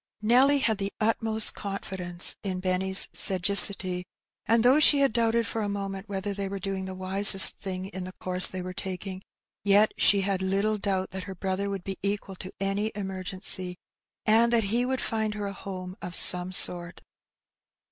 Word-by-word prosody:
Nelly 260 +6 +3
had 220 -6 -2
the 200 0 -4
utmost 220 0 +2
confidence 190 -3 -5
in 185 -2 -5
Benny's 190 +1 +3
sagacity, 185 -1 +4 0.4
and 230 0 +1
though 260 +4 +4
she 290 -2 +4
had 275 -5 +1
doubted 230 0 0
for 225 - -5
a 205 - -4
moment 195 0 -7
whether 200 0 -5
they 200 -1 -5
were 200 - -6
doing 190 0 -6
the 190 0 -8
wisest 190 +1 +6
thing 185 -1 -6
in 185 -2 -8
the 185 - -9
course 185 -1 0
they 185 -1 -7
were 185 0 -8
taking, 190 0 -7 0.4
yet 205 +2 +2
she 200 -1 +3
had 195 -1 -3
little 200 +3 -2
doubt 190 -1 -3
that 190 0 -7
her 190 0 -9
brother 190 +2 -4
would 195 -2 -6
be 195 -1 -8
equal 200 0 -5
to 185 - -9
any 200 +2 -3
emergency, 185 -2 -5 0.5
and 230 +2 +2
that 235 -2 +1
he 245 +1 0
would 260 0 -3
find 220 -1 -3
her 205 -1 -6
a 200 - -6
home 185 -2 -9
of 180 - -8
some 180 0 +6
sort. 175 -1 +3
195 Hz, 180 wpm, -25 LUFS, 185-215 Hz, 0.5 s, wisest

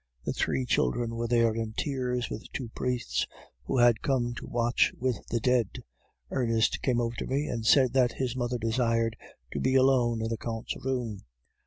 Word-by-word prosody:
The - - -1
three 70 -5 0
children 115 - +1
were 115 0 -2
there 115 -1 +3
in 110 -1 -3
tears, 125 -3 -1
with 110 - -7
two 125 -4 -4
priests, 125 +1 -1 0.4
who 135 - -1
had 120 -2 +5
come 120 -3 0
to - - -7
watch 120 0 +2
with 125 -2 -1
the 115 - -1
dead. 120 -3 +1 0.5
Ernest 115 -3 +1
came 125 -3 +1
over 120 0 -1
to - - -4
me, 140 +3 0
and 115 -6 -3
said 130 0 +5
that 125 -2 +3
his 130 -2 -2
mother 120 -1 -1
desired 115 0 +1 0.4
to - - -2
be 130 +1 +1
alone 125 -4 +3
in 110 - -1
the 115 - -2
Count's 115 0 -4
room. 120 -6 -2
120 Hz, 185 wpm, -28 LUFS, 115-125 Hz, 0.5 s, had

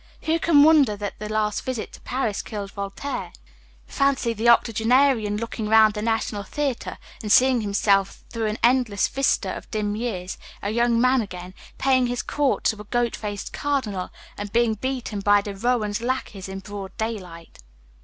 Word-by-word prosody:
Who 325 +1 +1
can 305 -4 +5
wonder 290 -9 +5
that 205 0 -5
the 210 0 -5
last 215 -1 -1
visit 255 -4 -4
to - - -12
Paris 245 -5 -2
killed 205 -3 -6
Voltaire? 200 +8 -5 0.5
Fancy 275 -4 +1
the 230 +2 +2
octogenarian 230 -1 +3
looking 225 -1 -4
round 220 -1 +6
the 210 - -4
national 225 -2 -1
theatre, 275 +5 -3 0.2
and 210 - -3
seeing 255 0 +5
himself, 200 -1 +1
through 225 -2 -2
an 215 +1 -2
endless 240 -4 +3
vista 275 0 0
of - - -10
dim 210 -2 -2
years, 205 -5 -4 0.2
a 205 - -1
young 235 +1 +2
man 255 +1 +4
again, 180 -3 -8 0.2
paying 260 -2 +3
his 245 0 -2
court 290 -2 0
to 215 -1 0
a - - -11
"goat 240 +2 0
faced 205 -2 -6
cardinal," 230 -11 -2 0.3
and 205 -1 -5
being 235 0 +3
beaten 245 -2 -3
by 205 +1 +4
De 200 0 -5
Rohan's 215 -1 0
lackeys 235 -6 -3
in 195 0 -6
broad 200 -1 -8
daylight. 185 -7 -6
220 Hz, 170 wpm, -24 LUFS, 205-250 Hz, 0.5 s, round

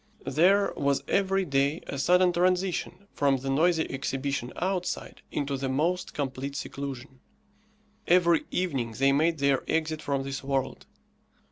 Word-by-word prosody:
There 195 +5 +3
was 140 -1 0
every 195 -1 +1
day 140 +1 0
a 140 - -5
sudden 180 +4 +4
transition 180 +2 0
from 140 -2 +2
the 135 +1 -3
noisy 160 +3 +3
exhibition 135 -2 -3
outside, 180 0 -3
into 140 -1 -2
the 135 0 -3
most 165 +7 -1
complete 140 0 -3
seclusion. 135 -2 -6 0.9
Every 170 -1 +4
evening 135 -11 -1
they 135 +1 +4
made 160 +4 +2
their 140 -1 +2
exit 155 -1 -1
from 140 -1 -1
this 135 0 -5
world. 135 -1 -2
145 Hz, 135 wpm, -27 LUFS, 135-180 Hz, 0.9 s, sudden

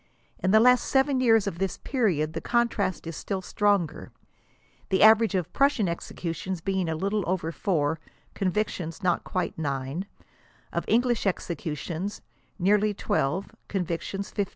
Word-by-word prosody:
In 185 - 0
the 215 +3 +6
last 250 +2 +5
7 265 -1 +2
years 225 -4 +4
of 175 -4 -4
this 195 -1 -1
period 175 - 0
the - - -4
contrast 235 -7 0
is 165 -1 -5
still 190 -2 -4
stronger, 200 -5 0 0.8
the 190 - +3
average 220 -1 +6
of 180 -1 -2
Prussian 275 -8 +3
executions 170 +1 -4
being 190 -1 -1
a 160 - -1
little 200 +5 -1
over 180 -3 -1
4; 160 -4 0 0.3
convictions, 185 -4 -2
not 175 -2 +1
quite 180 -3 -3
9; 140 +4 -3 0.7
of - - -1
English 240 -2 +2
executions, 170 +1 -3 0.3
nearly 205 +2 +2
12s» 190 -3 -1 0.2
convictions 185 +1 -3
15. 205 -2 -1
190 Hz, 140 wpm, -27 LUFS, 170-215 Hz, 0.8 s, the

